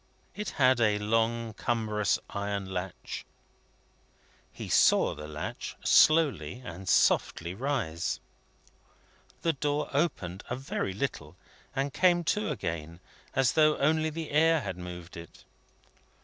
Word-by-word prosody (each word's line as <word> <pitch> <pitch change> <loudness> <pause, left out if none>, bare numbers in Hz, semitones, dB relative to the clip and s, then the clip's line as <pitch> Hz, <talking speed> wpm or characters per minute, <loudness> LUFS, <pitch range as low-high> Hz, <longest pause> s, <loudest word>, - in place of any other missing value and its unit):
It 210 -1 -4
had 130 -3 +4
a 105 -2 +3
long 115 +2 0
cumbrous 110 -3 0
iron 100 -1 -3
latch. 90 0 -5 1.3
He - - -8
saw - - +4
the 75 0 -8
latch 75 0 -6
slowly 135 - +4
and 90 +2 -6
softly 85 0 +2
rise. 110 - -2 1.2
The 165 - +2
door 145 +1 -1
opened 95 - -1
a 125 - -1
very 130 -7 -3
little, 90 - -4 0.4
and 135 0 -1
came 175 -2 +3
to 210 +1 -2
again, 80 0 -4 0.4
as 130 -3 +3
though 155 -1 +4
only 155 +2 +2
the 160 0 -6
air 160 +1 +4
had 95 -6 -4
moved 90 0 -8
it. 85 -1 -11
115 Hz, 120 wpm, -29 LUFS, 90-145 Hz, 1.3 s, had